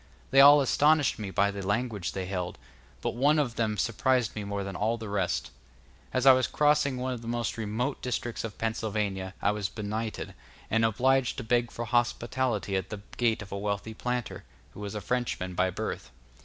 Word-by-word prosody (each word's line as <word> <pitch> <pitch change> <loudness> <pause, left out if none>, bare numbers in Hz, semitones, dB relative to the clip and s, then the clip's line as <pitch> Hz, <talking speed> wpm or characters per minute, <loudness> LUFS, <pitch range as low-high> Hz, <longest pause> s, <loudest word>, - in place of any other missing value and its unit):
They 135 - +7
all 145 +1 +9
astonished 145 +1 +3
me 105 -2 -4
by 100 +1 +2
the 100 0 -6
language 100 - -1
they 95 -1 -3
held, 90 -2 -3 0.4
but - - -1
one 145 +5 +3
of 140 -6 +1
them 110 -2 0
surprised 120 +3 +1
me 105 - -3
more 100 0 -3
than 95 -1 -6
all 110 +5 0
the 110 -1 -7
rest. 100 -3 -1 0.6
As 130 0 0
I 135 - +10
was 130 -1 +2
crossing 145 -2 +2
one 130 +1 -2
of 120 - -6
the 115 - -9
most 120 0 -1
remote 115 +5 -2
districts 120 -2 -3
of 115 -3 -6
Pennsylvania 105 -4 -2
I 100 - +4
was 105 -2 -2
benighted, 110 +1 -4 0.4
and 115 +1 +3
obliged 125 +4 +2
to 125 - -4
beg 120 +1 +1
for 120 - -5
hospitality 120 -2 0
at 95 -1 -2
the 105 -2 -6 0.2
gate 115 -3 +1
of 100 - -14
a 100 - -3
wealthy 100 +2 -3
planter, 125 +1 -3 0.3
who - - -12
was 105 0 -5
a 105 - -3
Frenchman 110 -4 -2
by 90 +1 +2
birth. 90 - -4
110 Hz, 195 wpm, -28 LUFS, 100-125 Hz, 0.6 s, I